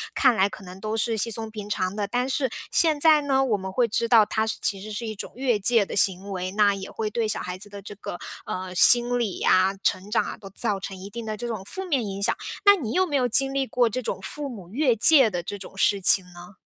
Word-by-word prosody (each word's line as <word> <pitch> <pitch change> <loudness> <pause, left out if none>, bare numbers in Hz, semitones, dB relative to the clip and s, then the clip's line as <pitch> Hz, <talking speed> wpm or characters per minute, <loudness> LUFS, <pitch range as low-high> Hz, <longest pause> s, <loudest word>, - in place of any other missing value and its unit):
看 255 -4 +4
来 195 -1 +2
可 205 - -11
能 180 0 -11
都 215 +1 -3
是 225 +1 0
稀 220 +2 0
松 225 0 -6
平 210 -1 -8
常 185 -2 -2
的。 205 -1 -2
但 245 +5 -1
是 265 0 -1 0.2
现 315 -3 +2
在 310 0 +5
呢， 270 -2 +1
我 230 -5 +1
们 190 -1 -6
会 240 +5 +1
知 230 +2 -1
道 225 -2 +6
它 220 +1 -1
是 220 - -2
其 195 -1 -1
实 215 +2 -8
是 215 +3 -4
一 220 - -4
种 - - -8
越 245 -4 0
界 215 +1 +3
的 - - -7
行 190 0 0
为， 185 -1 -4
那 205 -1 +3
也 195 -1 -7
会 215 -1 -4
对 225 +1 -1
小 215 - -1
孩 180 0 -6
子 205 +2 -10
的 200 0 -10
这 205 - -10
个， 195 -3 -7 0.3
呃， 185 0 -5
心 240 +6 +4
理 215 -6 -3
啊、 185 +1 +3
成 190 +1 -1
长 220 - +1
啊， - - -7
都 195 - -12
造 205 0 -2
成 190 0 -7
一 190 +2 -9
定 230 +2 -7
的 215 -1 -4
这 240 - -6
种 220 -5 -5
负 380 - -6
面 275 -10 -1
影 200 0 -5
响。 225 - +2 0.3
那 405 0 +8
你 260 - -5
有 370 +4 +2
没 305 -5 -3
有 255 -3 +2
经 270 +3 +6
历 275 -1 -1
过 245 -2 +1
这 255 +4 -3
种 205 - -4
父 290 +9 -6
母 195 -8 -10
越 255 +1 +1
界 265 +2 +6
的 175 -4 -4
这 205 - -6
种 195 0 -11
事 200 +1 +2
情 190 0 +5
呢？ 175 +3 -13
215 Hz, 295 characters per minute, -24 LUFS, 195-245 Hz, 0.3 s, 那